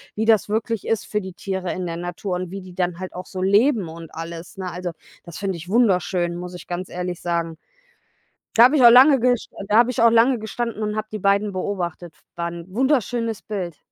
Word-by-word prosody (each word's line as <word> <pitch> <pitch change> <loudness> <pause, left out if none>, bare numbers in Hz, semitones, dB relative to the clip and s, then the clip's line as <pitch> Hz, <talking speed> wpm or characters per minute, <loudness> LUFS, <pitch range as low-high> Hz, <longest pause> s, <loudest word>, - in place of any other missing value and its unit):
wie 220 - -1
das 220 -2 +3
wirklich 220 0 -2
ist 225 -3 0
für 210 -1 -2
die 190 -1 -8
Tiere 190 -2 -4
in 185 - -4
der 165 -1 -4
Natur 175 +2 -4
und 185 -1 -5
wie 195 - -6
die 185 -1 -12
dann 180 -2 -1
halt 185 0 -6
auch 180 +1 -7
so 185 0 -4
leben 205 - +3
und 165 0 -10
alles, 165 +3 -8
ne? 185 -1 -4
Also, 180 0 -4 0.3
das 170 -2 -10
finde 195 -2 -2
ich 175 +2 -10
wunderschön, 185 -6 +2
muss 180 +1 -7
ich 180 - -10
ganz 180 +1 -4
ehrlich 180 0 -4
sagen. 170 -2 -2 1.0
Da 230 - +8
habe 265 +5 +5
ich 255 - +4
auch 235 - +11
lange 265 +3 +8
gest 245 0 +1 0.2
da 210 +2 +4
habe 240 +1 +5
ich 230 - 0
auch 230 - +7
lange 235 +2 +4
gestanden 220 +1 -4
und 210 0 -1
habe 215 0 -3
die 215 - -4
beiden 200 +1 +2
beobachtet. 180 -3 -4
F 150 - -30 0.2
War 170 0 -2
'n 170 -1 -8
wunderschönes 235 -1 0
Bild. 185 -6 -5
190 Hz, 230 wpm, -22 LUFS, 175-225 Hz, 1.0 s, auch